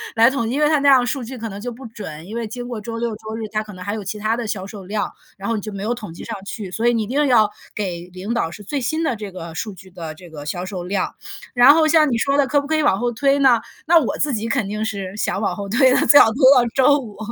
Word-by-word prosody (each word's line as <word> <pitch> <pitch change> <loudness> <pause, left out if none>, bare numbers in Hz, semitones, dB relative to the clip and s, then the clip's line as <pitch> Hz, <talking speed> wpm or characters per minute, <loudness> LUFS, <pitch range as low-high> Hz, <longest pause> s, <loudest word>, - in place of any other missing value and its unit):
来 230 +2 +6
统 265 -4 -2
计， - - -2
因 - - 0
为 300 - +4
它 305 -1 +3
那 285 0 +4
样 255 -2 +5
数 270 -3 -2
据 255 +2 -7
可 230 - -5
能 205 -1 -7
就 245 +1 -4
不 250 +2 -11
准， 185 -9 -8
因 220 - -7
为 235 -1 -2
经 245 +3 -6
过 235 -4 -5
周 230 +1 -6
六 235 0 -1
周 220 +1 -7
日， 220 - -4
它 215 0 -2
可 210 - -11
能 180 0 -9
还 205 - -2
有 215 -2 -4
其 210 +2 -5
他 215 +2 0
的 240 -1 -4
销 200 -3 -4
售 200 -2 -9
量， 205 +2 -2 0.3
然 195 - -6
后 230 - 0
你 205 - -3
就 215 - -6
没 195 -1 -6
有 225 +4 -1
统 210 -9 -8
计 - - -9
上 225 - -5
去， 200 -2 -6
所 225 +5 -2
以， 240 - +4
你 225 -2 0
一 - - -6
定 290 +4 +1
要 220 -5 +4 0.3
给 180 -4 -4
领 195 +6 -4
导 200 -9 0
是 205 +5 -10
最 280 +6 -3
新 315 +7 -1
的 250 - 0
这 205 -2 -7
个 170 -3 -8
数 205 +5 -4
据 190 +1 -14
的 165 -3 -7
这 175 0 -14
个 145 -2 -9
销 175 +4 -3
售 185 -3 -5
量。 190 +1 -2 0.4
然 250 +3 +8
后， 315 -1 +4
像 310 -2 +4
你 230 - +1
说 275 +5 +1
的， 280 - +3
可 285 +3 +2
不 285 - -5
可 315 - +1
以 310 - +2
往 195 -9 +3
后 240 0 0
推 275 +4 +2
呢？ 255 -4 +5 0.2
那 335 +1 +6
我 260 - -2
自 295 -3 0
己 225 +1 -2
肯 220 -3 0
定 210 +1 -3
是 200 -3 -4
想 205 - -1
往 - - -1
后 200 -1 -6
推 255 +4 +4
的， - - +3
最 285 - +9
好 - - +8
推 240 - -6 0.2
到 245 -1 +5
周 280 +2 +5
五， 225 -8 -8
225 Hz, 345 characters per minute, -21 LUFS, 200-255 Hz, 0.4 s, 最